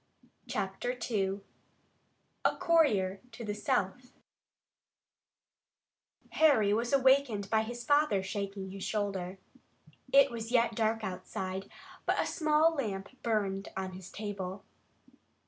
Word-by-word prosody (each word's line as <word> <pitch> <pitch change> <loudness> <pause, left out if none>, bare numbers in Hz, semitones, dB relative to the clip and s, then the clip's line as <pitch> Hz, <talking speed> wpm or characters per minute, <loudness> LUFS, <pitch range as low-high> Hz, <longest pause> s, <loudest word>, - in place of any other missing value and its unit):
CHAPTER 195 +6 -2
II 195 -2 0 1.0
A - - +3
COURIER 205 - +3
TO 230 +1 -8
THE 205 - -2
SOUTH 210 +3 -1 2.2
Harry 255 -10 +4
was 235 +2 0
awakened 265 -6 +3
by 220 -1 +4
his 240 +2 -5
father 290 -8 +3
shaking 195 0 -4
his 195 0 -7
shoulder. 195 -3 -2 0.7
It 275 -1 +6
was 230 -1 -5
yet 235 -2 +3
dark 225 0 0
outside, 185 0 -4 0.4
but - - +2
a - - +2
small 310 0 +3
lamp 200 -9 -3
burned 200 -4 -1
on 190 -1 -3
his 185 0 -10
table. 200 -2 -5
210 Hz, 110 wpm, -31 LUFS, 195-245 Hz, 2.2 s, It